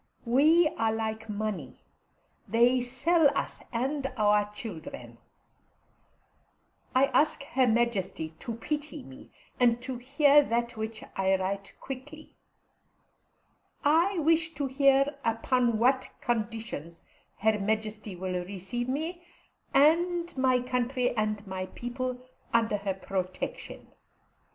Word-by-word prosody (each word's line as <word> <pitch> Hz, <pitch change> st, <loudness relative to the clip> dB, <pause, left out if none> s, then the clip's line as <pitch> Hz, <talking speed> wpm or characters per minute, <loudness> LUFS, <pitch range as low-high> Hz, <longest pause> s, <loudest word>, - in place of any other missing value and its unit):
We 305 Hz, +8 st, +5 dB
are 225 Hz, -1 st, +2 dB
like 220 Hz, 0 st, -3 dB
money; 205 Hz, -10 st, -4 dB, 0.6 s
they 240 Hz, +3 st, +4 dB
sell 290 Hz, +6 st, +3 dB
us -, -, -3 dB
and 270 Hz, +3 st, -1 dB
our 210 Hz, -1 st, +3 dB
children. 215 Hz, -, -8 dB, 1.8 s
I 260 Hz, +1 st, +6 dB
ask 300 Hz, -1 st, +2 dB
Her 265 Hz, -3 st, +1 dB
Majesty 220 Hz, -8 st, 0 dB
to 230 Hz, -, -5 dB
pity 295 Hz, +5 st, -4 dB
me, 130 Hz, 0 st, -13 dB, 0.3 s
and 240 Hz, -1 st, +4 dB
to 255 Hz, -1 st, -4 dB
hear 285 Hz, +3 st, +5 dB
that 235 Hz, -3 st, -1 dB
which 220 Hz, 0 st, -5 dB
I 190 Hz, 0 st, +2 dB
write 195 Hz, +1 st, -3 dB
quickly. 290 Hz, +4 st, -9 dB, 1.5 s
I 335 Hz, +6 st, +4 dB
wish 325 Hz, 0 st, +2 dB
to 280 Hz, 0 st, -1 dB
hear 275 Hz, +1 st, +3 dB
upon 235 Hz, +1 st, +1 dB
what 260 Hz, +3 st, +2 dB
conditions 220 Hz, -, -3 dB, 0.3 s
Her 215 Hz, +1 st, +2 dB
Majesty 215 Hz, 0 st, -2 dB
will 180 Hz, 0 st, -3 dB
receive 200 Hz, +6 st, -4 dB
me, 320 Hz, +6 st, -3 dB, 0.5 s
and 340 Hz, +4 st, +3 dB
my 260 Hz, -1 st, +3 dB
country 250 Hz, 0 st, 0 dB
and 215 Hz, -1 st, -1 dB
my 185 Hz, -1 st, -4 dB
people, 250 Hz, +4 st, -4 dB, 0.3 s
under 225 Hz, -3 st, +2 dB
her 200 Hz, -1 st, -3 dB
protection. 185 Hz, -1 st, -5 dB
240 Hz, 110 wpm, -29 LUFS, 210-275 Hz, 1.8 s, I